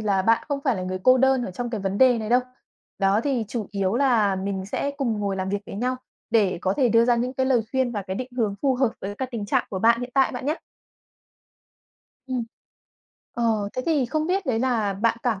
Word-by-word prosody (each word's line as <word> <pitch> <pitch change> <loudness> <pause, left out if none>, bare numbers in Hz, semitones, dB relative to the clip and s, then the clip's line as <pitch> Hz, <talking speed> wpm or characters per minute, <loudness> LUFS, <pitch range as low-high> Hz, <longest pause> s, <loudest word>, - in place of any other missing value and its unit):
là 200 -3 +1
bạn 225 +3 +3
không 285 -1 -1
phải 260 -5 +2
là 185 - -4
người 185 0 -3
cô 255 0 +6
đơn 265 -1 +3
ở - - -5
trong 240 +6 -4
cái 220 - -3
vấn 195 +1 -2
đề 255 -2 +5
này 215 -1 -4
đâu. 245 +1 +4 0.6
Đó 195 +2 +3
thì 260 -5 0
chủ 225 -3 -3
yếu 195 0 -1
là 235 -7 +3
mình 190 0 -3
sẽ 280 +7 -2
cùng 230 -7 -1
ngồi 200 -1 -1
làm 190 0 -2
việc 200 +1 0
với - - -8
nhau 250 +4 -1 0.3
để 210 -6 +2
có 190 - +1
thể 255 -4 +3
đưa 230 +1 +4
ra 240 0 +3
những 245 +2 -1
cái 260 0 0
lời 250 -3 +3
khuyên 260 -2 0
và 205 -2 -3
cái 190 0 -5
định 255 +3 -4
hướng 215 -5 0
phù 270 -2 +3
hợp 255 -1 +2
với 200 +1 -5
cái 260 +4 -4
tình 225 -4 -4
trạng - - +1
của 190 - -3
bạn 230 +3 +4
hiện 245 0 -5
tại 270 -1 +3
bạn 250 +1 -5
nhá! 305 +3 +1 1.7
Ừm. 255 -2 -2 0.9
Ờ, 225 -4 0
thế 255 - -3
thì 295 -7 +2
không 310 +5 -1
biết 375 +2 0
đấy 240 -4 +1
là 230 -5 +1
bạn 230 +3 +1
cảm 225 -6 0
235 Hz, 245 wpm, -24 LUFS, 200-255 Hz, 1.7 s, cô